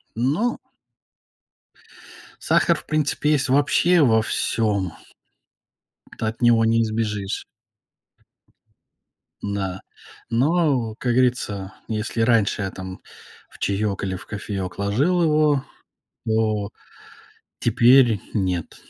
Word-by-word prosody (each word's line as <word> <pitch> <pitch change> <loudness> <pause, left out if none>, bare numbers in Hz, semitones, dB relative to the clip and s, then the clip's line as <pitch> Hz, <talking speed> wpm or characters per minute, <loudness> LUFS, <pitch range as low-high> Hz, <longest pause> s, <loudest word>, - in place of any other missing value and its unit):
Ну 150 - 0 1.9
сахар, - - +3
в - - -10
принципе, 150 0 0
есть 135 -2 0
вообще 160 +5 +3
во 110 -5 +4
всём. 100 -7 -1 1.3
Ты - - -2
от 110 +2 -5
него 115 -1 +5
не 115 +1 +3
избежишь. 105 -3 -3 2.0
Да, 95 -2 -3 0.5
но, 130 -3 +1
как 120 -2 0
говорится, 110 -6 0
если 110 +1 -3
раньше 115 -3 +2
я 95 - -2
там 95 0 -8 0.5
в - - -17
чаек 100 0 -1
или 95 -1 -2
в 90 - -10
кофеек 100 -3 -5
ложил 140 - +1
его, 150 -3 +2 0.6
то 110 -2 0 0.9
теперь 120 -3 +4
нет, 90 -5 -2
115 Hz, 100 wpm, -22 LUFS, 100-135 Hz, 2.0 s, него